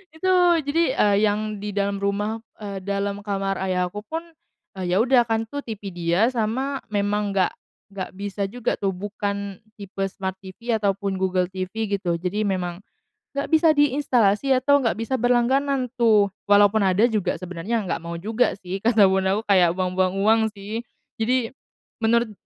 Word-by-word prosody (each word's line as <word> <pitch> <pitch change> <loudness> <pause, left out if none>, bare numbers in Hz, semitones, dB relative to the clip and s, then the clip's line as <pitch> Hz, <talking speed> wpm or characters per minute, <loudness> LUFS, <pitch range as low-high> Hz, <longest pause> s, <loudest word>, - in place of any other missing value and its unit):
itu 320 +4 -3 0.4
jadi, 325 +4 +2 0.2
eee, 205 -1 +4
yang 210 0 -1
di 210 - -3
dalam 200 0 -1
rumah 205 +3 -2 0.2
eee, 200 -3 -6
dalam 200 +1 -2
kamar 195 -1 -1
ayah 180 -1 0
aku 205 +4 -8
pun, 320 +9 -4 0.6
eee, 185 -2 -3
ya 185 - +3
udah 245 +1 +4
kan, 225 -1 -1
tuh 285 +5 -6
TV 210 -3 -6
dia 175 +5 +2
sama 255 +3 -2
memang 205 0 0
nggak 190 -2 +2 0.4
nggak 185 -2 -4
bisa 200 0 -3
juga 245 0 -1
tuh, 195 -1 -1
bukan 200 0 -4 0.2
tipe 195 -1 -5
Smart 190 -1 -4
TV 230 +5 -3
atau 205 -2 +2
pun 195 0 -3
Google 185 -1 0
TV 190 +4 -4
gitu, 185 -4 -1
jadi 185 +5 -1
memang, 185 -2 -2 0.5
nggak 280 - -1
bisa 320 0 +5
diinstalasi 265 -4 +3
atau 285 +3 +4
nggak 230 -4 +1
bisa 230 +4 -3
berlangganan 250 +2 +1
tuh. 210 -4 +4 0.2
Walaupun 205 +1 +5
ada 190 +2 +3
juga, 205 -5 0
sebenernya 185 +5 -3
nggak 180 - -2
mau 170 0 -6
juga 220 +8 0
sih 190 0 -5
kata 225 -1 +4
bundaku 190 +2 +1
kayak, 185 -4 +5
"Buang-buang 185 0 0
uang," 215 +3 +4 0.2
sih. 205 +3 -5 0.4
Jadi, 235 +1 +1 0.5
menurut, 235 0 +2
205 Hz, 165 wpm, -23 LUFS, 190-230 Hz, 0.6 s, bisa